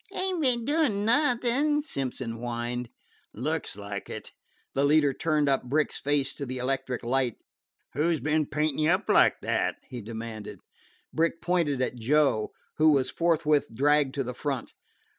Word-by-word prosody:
"Ain't 370 -3 -2
be'n 245 -5 +1
doin' 280 -9 +1
nothin'," 270 +3 +2
Simpson 130 - -4
whined. 120 0 -4 0.5
"Looks 155 +4 -2
like 100 -1 -6
it." - - -7 0.4
The 135 - +1
leader 145 -1 +4
turned 155 -1 +1
up 135 -1 +2
Brick's 150 +4 0
face 140 -2 +1
to 140 - -5
the 130 +1 -4
electric 130 0 -2
light. 125 -1 0 0.6
"Who 155 +4 +1
's 160 - 0
been 150 +2 +1
paintin' 150 0 -1
you 155 +1 +3
up 185 +4 +1
like - - +4
that?" - - 0
he 125 -2 -6
demanded. 110 -1 -7 0.6
Brick 165 +1 +1
pointed 165 -7 +1
at 125 - -3
Joe, 135 -3 +2 0.3
who 155 0 +6
was 130 -2 +1
forthwith 160 -3 +2
dragged 145 +1 +3
to 140 - 0
the 125 0 -5
front. 135 -1 -4
145 Hz, 160 wpm, -27 LUFS, 125-165 Hz, 0.6 s, who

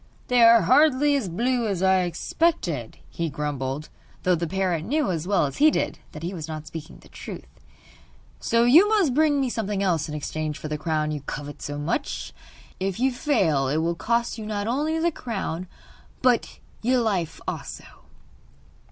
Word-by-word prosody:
'They 250 -1 +4
are 230 0 +8
hardly 285 - +4
as 245 -10 -1
blue 240 +6 0
as 190 -3 -1
I 190 0 +4
expected,' 175 - -1
he 170 -1 -3
grumbled, 145 0 -3 0.3
though 180 - +3
the 170 0 -1
parrot 185 -2 -1
knew 285 - 0
as 165 0 -3
well 200 -6 +3
as 140 - -5
he 305 +2 +6
did - - -1
that 150 - -8
he 175 +3 -3
was 160 -4 -6
not 155 -1 -6
speaking 155 0 -9
the - - -18
truth; - - -9 0.9
'so 230 0 +2
you 320 +12 +7
must 395 - +3
bring 295 0 +3
me 270 - +1
something 210 -4 -2
else 165 -5 0
in 150 - -4
exchange 155 0 -3
for 155 - -6
the 150 - -2
crown 155 -1 -1
you 150 -2 -4
covet 145 +1 -7
so 145 0 -4
much. 165 - -3 0.5
If 190 +1 -2
you 265 +2 +3
fail 185 - +1
it 145 +4 0
will 165 +2 +1
cost 235 +6 -1
you 215 - -6
not 205 -1 -2
only 295 +7 0
the 340 +1 +1
crown 195 - -4 0.6
but 250 -2 +2 0.2
you 250 +2 +2
life 195 -8 -1
also. - - -5
190 Hz, 180 wpm, -25 LUFS, 155-250 Hz, 0.9 s, are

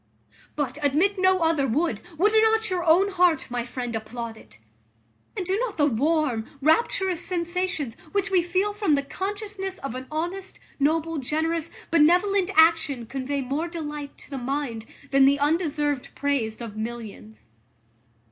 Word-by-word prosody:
But, 290 0 -2
admit 330 +8 +2
no 375 -1 +3
other 320 -4 +2
would, 310 +8 0 0.2
would 410 +6 +3
not 445 -1 +3
your 360 -2 0
own 360 +5 +4
heart, 360 -3 +3
my 240 -1 -1
friend, 245 -1 -5
applaud 225 +1 -5
it? 110 - -17 0.8
And 375 - -2
do 375 +2 0
not 475 -4 -2
the 295 - +4
warm, 285 -3 +1
rapturous 350 - +2
sensations, 345 - -2 0.2
which 395 -1 0
we 370 -2 +4
feel 370 +4 0
from 410 -8 +2
the 280 - 0
consciousness 390 +3 -4
of 275 -4 -5
an 255 +1 -6
honest, 350 +5 -4 0.2
noble, 320 +2 +1
generous, 315 +4 -1 0.2
benevolent 360 +4 +4
action, 320 -6 +4
convey 270 +3 -3
more 280 +6 -2
delight 300 -4 -6
to - - -15
the 275 - -3
mind 245 -4 -3 0.2
than 270 -1 +6
the 280 +1 +4
undeserved 295 -2 0
praise 250 -6 -1
of 225 -3 -7
millions? 220 - -7
310 Hz, 150 wpm, -25 LUFS, 270-365 Hz, 0.8 s, than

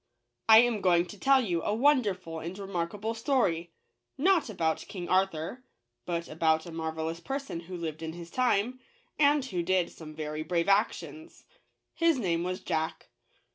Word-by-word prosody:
I 220 0 +10
am 240 -4 +1
going 175 -2 +4
to 195 +3 -11
tell 270 -1 +5
you 170 -4 0
a 205 - -1
wonderful 210 - +1
and 170 +4 -6
remarkable 195 +3 -3
story, 225 - 0 0.5
not 340 -1 +3
about 165 -6 0
King 180 -3 -6
Arthur, 190 +5 0 0.4
but 170 -1 -2
about 160 0 +1
a 170 - -8
marvel 160 -1 -3
ous 165 +1 -4
person 270 -4 -4
who 180 +2 -8
lived 160 -2 -5
in 160 0 -4
his 170 0 -10
time, 250 0 +1 0.4
and 290 -2 +4
who 185 -9 -2
did 180 0 +1
some 155 -2 -11
very 155 0 -4
brave 170 +2 0
actions. 225 +10 -1 0.5
H - - -21
is 330 -3 +4
name 170 -7 0
was 185 +1 -3
Jack. 160 0 -3
180 Hz, 170 wpm, -29 LUFS, 165-230 Hz, 0.5 s, I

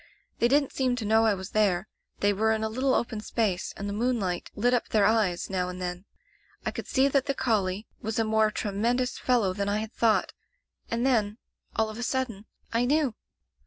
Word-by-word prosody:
They 235 - +4
didn't 280 +2 +2
seem 255 -2 +1
to 235 -3 -4
know 220 +1 +4
I 210 - +3
was 190 +1 -8
there. 200 -3 +2 0.3
They 205 0 +3
were 220 +2 +2
in 220 0 -1
a 220 - 0
little 255 +4 +1
open 225 -2 -1
space, 210 -5 -1
and 200 - -4
the 200 - -3
moonlight 210 -6 -1
lit 245 +4 +2
up 245 - +1
their 210 -2 +3
eyes 205 -5 +2
now 180 -2 -1
and 180 0 -7
then. 180 +1 -4 0.6
I - - 0
could - - -6
see 265 +1 +3
that 275 0 +1
the 275 - 0
collie 210 -6 0 0.2
was 220 0 -3
a 225 - +3
more 220 0 +3
tremendous 235 +5 -1
fellow 230 -7 +2
than 200 +1 -2
I 205 - +1
had 220 +2 -4
thought— 225 -2 +2 0.6
and 235 +2 0
then 220 -5 +2 0.2
— - - -37
all 220 - +2
of 215 - -9
a - - -3
sud 260 +1 0
den 210 -1 -11
— - - -19
I 235 +2 +2
knew! 285 -2 +2
220 Hz, 225 wpm, -27 LUFS, 200-245 Hz, 0.6 s, They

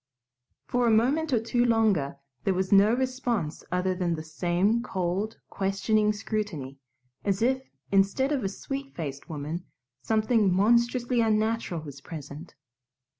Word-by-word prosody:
For 245 -1 +1
a - - +5
moment 270 +8 +2
or 240 - +3
two 240 +2 +1
longer 215 - +2 0.3
there 195 - +1
was 185 0 -1
no 200 +2 +6
response 245 -10 -2
other 180 +1 +1
than 180 -2 -1
the 155 - -6
same 175 +8 +1
cold, 190 0 -2
questioning 205 +2 +1
scrutiny, 205 -11 -4 0.4
as 200 +1 0
if, 260 +2 0 0.2
instead 200 +8 +3
of 275 -5 0
a 195 - 0
sweet 275 +7 -6
faced 140 -2 -6
woman, 155 +3 -4 0.4
something 220 -2 +2
monstrously 235 +5 +3
unnatural 220 -5 0
was 140 -3 -10
present. 150 +1 -9
205 Hz, 135 wpm, -27 LUFS, 175-235 Hz, 0.4 s, no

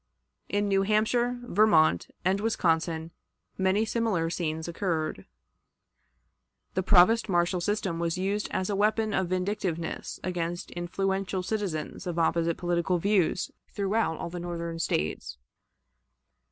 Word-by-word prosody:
In 205 0 +1
New 195 -1 +3
Hampshire, 220 +4 +2
Vermont, 175 - +4 0.2
and 190 +2 +2
Wisconsin 165 -6 0 0.4
many 190 +3 +2
similar 215 -8 0
scenes 160 -2 -2
occurred. 165 - -2 1.5
The 185 - +1
provost 205 +4 +5
marshal 175 0 +2
system 190 -3 -1
was 170 0 -1
used 200 +3 -1
as 185 +2 -1
a - - 0
weapon 215 +1 +1
of 190 -1 +1
vindictiveness 185 -3 -2
against 175 -1 -3
influential 190 +2 -2
citizens 185 -7 -3
of 175 -1 -3
opposite 165 0 +1
political 175 +1 0
views 195 -1 +1 0.2
throughout 200 -4 0
all 170 - -5
the 175 - -5
Northern 170 -1 -4
States. 75 - -2
180 Hz, 120 wpm, -28 LUFS, 170-205 Hz, 1.5 s, provost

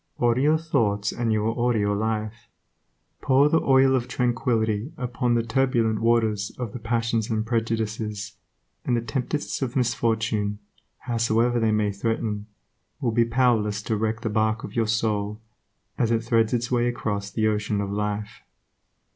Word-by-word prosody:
Order 120 +1 +2
your 155 +3 +4
thoughts 110 -10 0
and 120 -2 -1
you 110 -1 +1
will 115 +1 0
order 120 -1 +1
your 100 -1 +1
life. 110 +1 -3 0.7
Pour 140 +2 +4
the 160 - +3
oil 135 0 +4
of 125 -1 -1
tranquility 120 -1 0
upon 125 -1 0
the 115 - +1
turbulent 115 -2 +1
waters 110 -3 +2
of 120 -5 -5
the 125 - -5
passions 115 0 -1
and 110 -1 -1
prejudices, 110 -2 -2 0.5
and 120 - +1
the - - 0
tempests 125 +7 -3
of 130 0 -2
misfortune, 110 -4 0 0.4
howsoever 120 0 +1
they 110 -1 +2
may 105 -1 +1
threaten, 105 0 -2 0.5
will 120 - 0
be 115 +1 +3
powerless 115 -4 +1
to 110 - -1
wreck 110 +1 -1
the 115 - -2
barque 110 +1 +1
of - - -8
your 115 -2 +1
soul, 105 -1 -1 0.6
as 115 - +2
it 115 -1 +1
threads 115 -1 +2
its 120 0 -1
way 120 -1 +2
across 105 -4 -2
the 110 +1 -1
ocean 105 -1 0
of 100 -1 -2
life. 105 +3 -3
115 Hz, 165 wpm, -25 LUFS, 110-120 Hz, 0.7 s, your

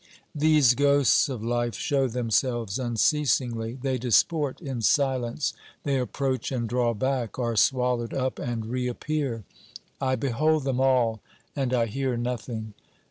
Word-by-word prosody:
These 150 -4 +4
ghosts 140 +1 +3
of 125 -5 -5
life 120 0 -1
show 135 -2 0
themselves 120 -2 -1
unceasingly, 120 -2 0
they 130 0 -1
disport 135 +4 +2
in 135 -7 -5
silence, 130 +1 +1 0.3
they 140 -2 0
approach 130 +1 -2
and 120 -3 -2
draw 120 0 0
back, 130 -2 -2
are 120 -2 -1
swallowed 125 0 +2
up 130 -1 -2
and 115 -2 -3
reappear; 125 +1 -2 0.6
I 130 -1 +1
behold 145 +5 +1
them 130 -2 -1
all 120 -5 +2 0.3
and 135 -3 -1
1 115 -3 +1
hear 130 +1 -1
nothing. 115 -2 -4
125 Hz, 135 wpm, -26 LUFS, 120-135 Hz, 0.6 s, These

